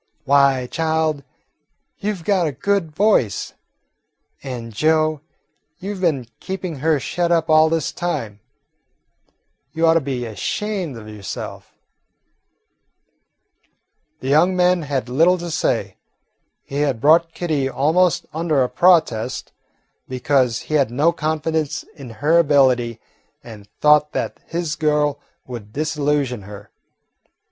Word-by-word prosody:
"Why, 140 -2 +4
child, 160 0 -1 0.8
you 210 +1 -1
've 175 - -12
got 185 -3 +2
a - - -1
good 195 +5 -1
voice. 155 - +1 0.9
And, 120 -4 -7
Joe, 155 +3 +1 0.6
you 200 +3 -5
've 190 - -8
been 150 -9 +1
keeping 185 -4 -5
her 155 +2 +1
shut 170 +7 -1
up 165 -2 +2
all 155 0 +6
this 160 -2 -1
time. 115 -12 -4 1.3
You 165 +1 +1
ought 165 - +5
to 165 - +3
be 130 -3 -3
ashamed 165 - -3
of 110 -1 -11
yourself." 105 -4 -8 2.5
The 130 - -5
young 170 +6 +4
man 180 -1 +3
had 140 -4 -3
little 165 +9 +3
to 170 -1 -6
say. - - -1 0.7
He 140 - -6
had 140 -5 0
brought 165 +5 +4
Kitty 150 -6 -1
almost 160 +5 +2
under 155 -4 +1
a 125 - -1
protest, 155 -10 +2 0.6
because 130 -2 +1
he - - -7
had 140 -6 +3
no 145 +8 +2
confidence 155 -1 -2
in 140 -5 -10 0.2
her 165 +2 +5
ability 130 -7 +3 0.4
and 105 -3 -12
thought 150 0 +4
that - - -3
his 165 -2 -3
"girl" 150 -2 +1 0.3
would 115 -5 -8
disillusion 145 -5 -1
her. 100 +1 -11
150 Hz, 125 wpm, -20 LUFS, 130-165 Hz, 2.5 s, all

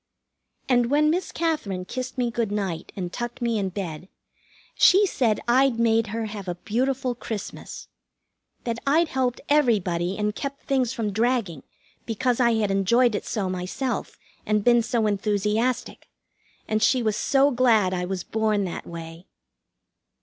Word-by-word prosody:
And 245 -2 +3
when 300 +2 +3
Miss 360 +3 -2
Katherine 260 - -2
kissed 255 +5 -5
me 245 -2 0
good 230 -3 -1
night 195 -6 -3
and 180 -3 -5
tucked 240 0 -5
me 235 -3 0
in 195 -1 -1
bed, 180 -2 -6 0.6
she 395 +3 +6
said 240 - +1
I'd 255 0 +4
made 225 -1 +2
her 225 +2 -3
have 205 -3 -7
a 175 - -2
beautiful 250 +6 -1
Christmas. 225 -4 -7 0.8
That 235 -1 -3
I'd 320 +3 +3
helped 255 -2 -1
everybody 195 - +2
and 210 0 0
kept 275 +4 -6
things 265 -5 +1
from 225 -5 -2
dragging, 220 - 0 0.5
because 245 +2 0
I 235 -2 +4
had 210 -3 +1
enjoyed 230 +5 +3
it 205 - -3
so 205 -4 -1
myself, 185 +8 -3 0.3
and 210 -1 +1
been 240 0 +5
so 230 -1 0
enthusiastic, 210 +4 -1 0.6
and 215 0 0
she 250 +2 +3
was 215 -2 +1
so 275 +5 +3
glad 230 -7 +3
I 180 -1 -1
was 185 -1 -3
born 215 -2 0
that 180 - -5
way. 165 +1 -9
225 Hz, 155 wpm, -24 LUFS, 200-255 Hz, 0.8 s, she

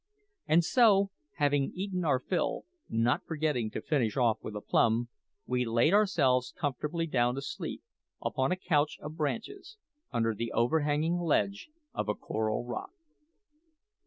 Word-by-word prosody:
And 165 +2 +4
so, 200 -3 +4 0.2
having 145 -1 +1
eaten 185 -1 -2
our 145 -5 +3
fill, 175 +6 -1 0.2
not 115 +2 +1
forgetting 150 -8 -1
to - - -6
finish 125 -8 0
off 115 -4 +3
with 105 - -7
a - - -2
plum, 115 +3 +2 0.4
we 125 0 0
laid 120 +8 +2
ourselves 140 -12 +3
comfortably 150 +4 -2
down 125 -5 +1
to 135 - -3
sleep, - - -5 0.4
upon 130 +3 -1
a - - +3
couch 155 -5 +1
of 155 +1 -7
branches, 230 - -4 0.3
under 115 -2 +1
the 115 +2 -4
overhanging 150 +6 +1
ledge 200 - 0 0.2
of - - -2
a 105 - +1
coral 110 +2 -2
rock. 120 - -5
145 Hz, 145 wpm, -30 LUFS, 120-170 Hz, 0.4 s, And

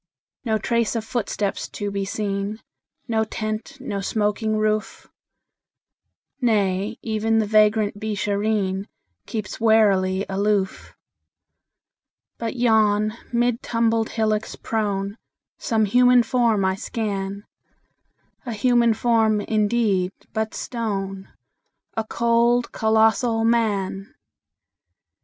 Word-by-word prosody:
No 220 -3 +1
trace 235 +1 0
of 225 -1 -2
footsteps 210 -4 -2
to 205 0 -4
be 200 0 -2
seen, 200 +1 -3 0.5
No 220 -2 +1
tent, 215 +4 -5
no 205 -7 -4
smoking 215 +1 0
roof; 215 0 -1 1.3
Nay, 205 -2 +1
even 225 0 0
the 220 - +2
vagrant 210 -1 +3
Beeshareen 205 -1 -1 0.4
Keeps 215 -4 -5
warily 200 -4 +3
aloof. 200 0 -1 1.4
But 230 +1 -3
yon, 215 -3 +3 0.2
mid 240 0 +1
tumbled 230 -2 +1
hillocks 215 -1 -1
prone, 205 -1 -2 0.4
Some 220 -2 +1
human 245 +3 +5
form 230 -5 +2
I 190 - +2
scan 200 -1 -4 1.0
A 240 - -4
human 235 +1 +3
form, 220 -2 +2
indeed, 210 -3 +1 0.2
but 220 0 -2
stone: 195 -5 -4 0.6
A 225 - 0
cold, 235 +2 +2
colossal 225 +1 +2
Man! 205 -4 0
215 Hz, 95 wpm, -23 LUFS, 200-230 Hz, 1.4 s, human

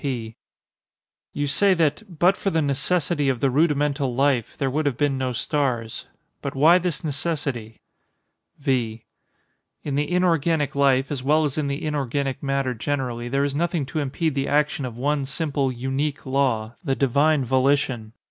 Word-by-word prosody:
P. 120 -6 -4 1.0
You 145 - -2
say 190 +7 +3
that 155 0 +1 0.2
"but 180 +5 +4
for 195 - -1
the 165 -4 +1
necessity 145 +1 +1
of 130 -3 0
the 135 +1 +2
rudimental 145 -3 +1
life" 135 -3 +1
there 135 -2 -1
would 150 +2 0
have 130 -4 -1
been 145 -1 +1
no 130 -1 -1
stars. 120 -3 -2 0.3
But 140 - -4
why 160 +6 +6
this 175 -3 -2
necessity? 140 -7 -3 0.8
V. 120 -5 -1 0.8
In 145 - -3
the 145 +3 -1
inorganic 165 -4 +2
life, 140 -1 +2
as 140 -3 -3
well 150 +4 +3
as 140 - -2
in 150 -2 -1
the 140 +3 -3
inorganic 140 -2 -2
matter 135 -2 0
generally, 120 0 -3
there 135 +2 +1
is 140 -1 -1
nothing 165 0 0
to 135 +4 -3
impede 150 +2 -1
the 135 0 -1
action 150 0 +1
of 120 -2 -7
one 145 +2 0
simple 140 -1 -1
unique 135 +4 -3
law—the 130 - -1
Divine 140 +2 +2
Volition. 130 -3 +1
140 Hz, 160 wpm, -23 LUFS, 130-150 Hz, 1.0 s, why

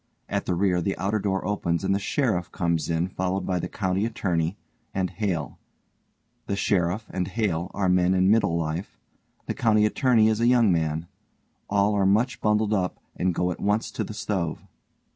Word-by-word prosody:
At - - -2
the 90 - +1
rear 90 -1 +2
the 95 +3 -2
outer 100 +4 0
door 95 -1 -1
opens 85 -4 -1
and 95 0 +2
the_ 100 - +1
SHERIFF 105 -6 0
comes 85 -3 -1
in 85 +1 +1
followed 95 +1 -2
by 90 -1 0
the - - -3
COUNTY 95 -1 -1
ATTORNEY 90 -5 -1 0.4
and 95 -2 0
HALE. 90 -8 -3 0.9
The 100 - -1
SHERIFF 100 +1 0
and 90 -2 -2
HALE 95 -4 -1
are 100 -2 +1
men 90 0 +3
in 95 +1 +4
middle 100 -6 +3
life, 80 +3 -3 0.5
the - - -2
COUNTY 110 -5 +3
ATTORNEY 115 0 +3
_is 110 0 +2
a 120 - +3
young 120 -5 +5
man; 80 -1 0 0.6
all 100 +1 +2
are 100 -2 +2
much 115 +4 +2
bundled 105 0 +2
up 90 -3 0 0.2
and 90 -1 0
go 90 0 +1
at - - -6
once 105 +2 0
to - - -3
the 110 - -7
stove. 95 -6 -3
95 Hz, 185 wpm, -25 LUFS, 90-105 Hz, 0.9 s, young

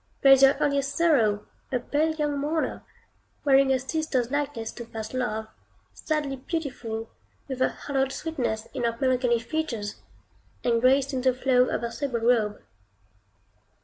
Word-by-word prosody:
There 275 - +8
is 270 -1 +8
your 270 0 +7
earliest 280 -1 0
Sorrow, 230 -12 +3 0.3
a 255 - +2
pale 310 +5 0
young 295 -2 -1
mourner, 305 +3 -1 0.6
wearing 270 -1 +5
a 265 - +4
sister's 260 -2 -1
likeness 285 -6 -2
to 235 - -8
first 220 0 -7
love, 230 -4 -2 0.5
sadly 295 -3 -2
beautiful, 250 -7 -4 0.4
with 260 -2 -5
a - - +4
hallowed 270 -2 -2
sweetness 240 -9 -3
in 260 -3 -3
her 230 0 -1
melancholy 255 -2 +2
features, 230 -5 -4 0.6
and 230 -1 +2
grace 270 +2 +3
in 260 - -1
the 255 -1 +2
flow 255 -1 +3
of - - -1
her 235 0 -3
sable 250 -3 -3
robe. 225 -3 +2
260 Hz, 150 wpm, -26 LUFS, 235-285 Hz, 0.6 s, There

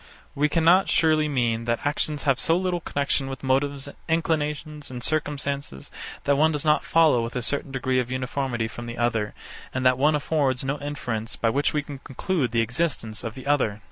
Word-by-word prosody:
We 150 +2 +2
cannot 170 +5 +4
surely 155 -2 +3
mean 115 -4 0
that 115 +2 -1
actions 145 0 -1
have 135 -3 +2
so 165 - +3
little 180 -1 0
connexion 140 -3 -1
with 135 0 -7
motives, 135 +1 0 0.2
inclinations, 150 -2 -1
and 125 -2 -7
circumstances, 140 - -2 0.3
that 140 - +3
one 155 +2 +4
does 150 0 -1
not 150 0 +3
follow 160 -7 +4
with 115 +2 -5
a 125 - -2
certain 140 +2 -2
degree 130 -1 0
of 125 -1 -2
uniformity 130 -2 -2
from 120 +1 -8
the 120 0 -6
other, 115 -3 0 0.4
and 130 0 -1
that 130 0 +4
one 150 +2 +4
affords 145 -4 0
no 135 +2 -2
inference 125 -6 -3
by 115 - +1
which 140 +4 +1
we 150 -1 -1
can 140 -1 -8
conclude 135 - -2
the 115 0 +2
existence 115 -4 -2
of 115 -2 -5
the 130 - -9
other. 130 -8 +1
140 Hz, 195 wpm, -25 LUFS, 120-150 Hz, 0.4 s, cannot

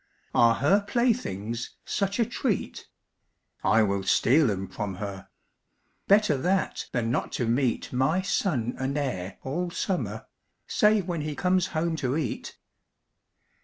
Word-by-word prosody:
Are 115 -1 +5
her 190 - +3
playthings 125 - -1
such 195 0 -1
a 230 - +4
treat? 240 -3 -2 0.8
I 110 - +4
will 100 -1 0
steal 130 +8 +4
'em 95 -1 -2
from 100 -2 -4
her; 100 0 -6 0.8
Better 200 -7 +4
that 185 +7 0
than 115 -2 0
not - - -1
to 120 - -1
meet 120 +1 0
My 155 +9 +2
son 150 - 0
and 135 +2 -1
heir 100 -10 -3
all 175 +7 -2
summer, 180 +1 -2 0.4
Save 210 -3 +3
when 170 -3 -2
he 150 0 -4
comes 185 +3 +2
home 165 +1 0
to 135 -1 -1
eat. 145 -8 -4
140 Hz, 135 wpm, -27 LUFS, 115-185 Hz, 0.8 s, Are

